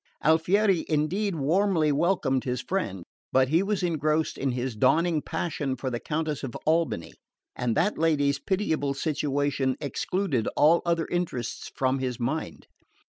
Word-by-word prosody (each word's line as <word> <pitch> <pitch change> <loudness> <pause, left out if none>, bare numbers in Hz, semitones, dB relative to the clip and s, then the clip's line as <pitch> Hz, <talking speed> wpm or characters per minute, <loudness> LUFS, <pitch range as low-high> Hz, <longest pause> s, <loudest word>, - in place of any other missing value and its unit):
Alfieri, 175 +4 +3
indeed, 170 +6 0
warmly 160 +1 +2
welcomed 145 -4 +1
his 125 -1 -2
friend; 130 - -3 0.3
but 130 0 +3
he 165 +4 +3
was 200 -1 -1
engrossed 155 -2 0
in 135 - -1
his 125 -1 -3
dawning 165 +7 +2
passion 145 -6 -3
for 130 0 -4
the 120 - -2
Countess 155 +1 -2
of 135 -4 -6
Albany, 160 - 0 0.4
and 120 -2 -1
that 205 +1 +1
lady's 145 -4 +2
pitiable 160 -6 -1
situation 140 -3 0
excluded 150 - -1
all 160 +3 +5
other 170 -1 +1
interests 170 -10 -3
from 130 0 +1
his 125 -2 -3
mind. 135 +7 -3
150 Hz, 140 wpm, -27 LUFS, 135-170 Hz, 0.4 s, all